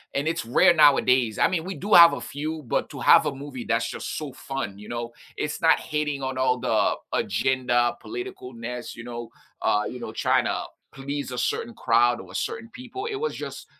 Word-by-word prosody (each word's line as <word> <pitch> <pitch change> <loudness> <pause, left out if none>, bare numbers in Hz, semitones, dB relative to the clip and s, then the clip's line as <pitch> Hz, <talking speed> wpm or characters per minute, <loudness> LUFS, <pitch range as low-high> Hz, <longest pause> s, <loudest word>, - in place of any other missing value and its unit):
and 140 +3 0
it's 165 0 -1
rare 120 +8 +5
nowadays. 130 -6 +4
I - - +4
mean, 175 -2 -2
we 190 - -5
do 205 +3 -2
have 170 -1 +10
a - - -3
few, 155 +2 -5
but 115 - -1
to - - -9
have - - +6
a 145 - -1
movie 135 -3 -7
that's 115 0 0
just - - -5
so 150 -4 -5
fun, 130 -7 -5
you 105 - -11
know, 120 0 -4 0.3
it's 150 - -3
not 160 - +5
hitting 150 -3 -2
on 130 0 -3
all 125 -1 +2
the - - +1 0.2
agenda, 120 +2 +1
political 380 +1 -7
nest, 125 - -6
you 120 - -9
know, 120 -1 -7 0.3
uh, 105 0 +2
you 125 - -7
know, - - -6
trying - - +2
to - - -1 0.3
please 140 0 -5
a 125 - -5
certain 120 -1 -2
crowd 120 +1 +3
or 90 -1 -13
a - - -10
certain 230 0 -3
people, 260 - -7
it 420 - -3
was 460 +3 -2
just - - -7
135 Hz, 215 wpm, -25 LUFS, 120-160 Hz, 0.3 s, have